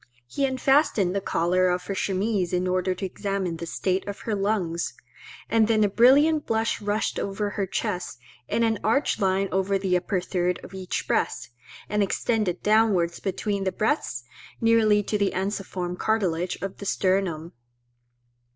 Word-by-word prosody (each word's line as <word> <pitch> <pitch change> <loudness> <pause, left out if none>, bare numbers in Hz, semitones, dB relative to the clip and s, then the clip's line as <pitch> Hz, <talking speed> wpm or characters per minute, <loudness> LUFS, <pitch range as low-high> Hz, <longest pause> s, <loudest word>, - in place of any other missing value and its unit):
He 275 - -1
unfastened 260 - +2
the 200 - 0
collar 180 0 +1
of 180 0 -1
her 200 - -3
chemise 195 -1 -1
in 180 +1 +1
order 185 0 0
to 195 - -4
examine 190 -2 -3
the 170 +1 -6
state 185 +3 -1
of 200 - -6
her 225 - -3
lungs; 195 -4 -1 0.5
and 225 -1 +3
then 220 -1 +3
a 205 - +3
brilliant 285 +8 +4
blush 225 0 0
rushed 205 +1 -1
over 205 +1 -2
her 200 -2 -2
chest, 180 - -3 0.3
in 230 - +1
an 225 -2 +1
arched 225 +3 +1
line 195 0 +2
over 195 +1 +1
the 190 -2 0
upper 180 +1 0
third 180 0 -1
of - - -11
each 190 -1 -4
breast, - - -1 0.4
and 210 0 0
extended 200 -2 0
downwards 205 -6 +3
between 200 0 -2
the 190 - 0
breasts 210 - -1 0.4
nearly 220 -2 +4
to 210 +1 -1
the 200 -1 +1
ensiform 190 -2 -3
cartilage 180 -5 0
of 195 -1 -4
the 200 - -7
sternum. 185 -5 0
195 Hz, 160 wpm, -25 LUFS, 180-215 Hz, 0.5 s, brilliant